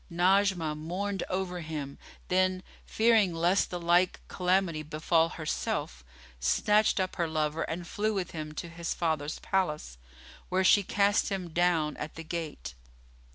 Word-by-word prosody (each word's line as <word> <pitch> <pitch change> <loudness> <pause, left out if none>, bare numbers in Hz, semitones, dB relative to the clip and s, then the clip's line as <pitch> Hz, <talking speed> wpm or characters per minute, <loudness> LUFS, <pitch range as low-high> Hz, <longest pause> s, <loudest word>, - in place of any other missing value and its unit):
Najmah 180 -2 +2
mourned 185 +5 -3
over 185 -1 -2
him; 150 -3 -6 0.3
then, 185 0 +1 0.2
fearing 220 -6 +3
lest 175 +4 +2
the 180 - -4
like 175 +2 +3
calamity 180 -3 +1
befal 160 +2 +1
herself, 155 - -3 0.4
snatched 210 - +3
up 185 0 -2
her 170 -2 +1
lover 155 0 -1
and 170 +2 -3
flew 215 +4 -1
with 185 -3 -2
him 155 -2 -5
to 160 - -5
his 170 0 -4
father's 155 -3 -1
palace, 150 - -2 0.5
where 185 +1 +2
she 205 +2 +6
cast 200 +1 +2
him 190 -3 -3
down 165 -2 +1
at 155 - -6
the 165 - -7
gate. 155 - -5
175 Hz, 145 wpm, -29 LUFS, 155-185 Hz, 0.5 s, she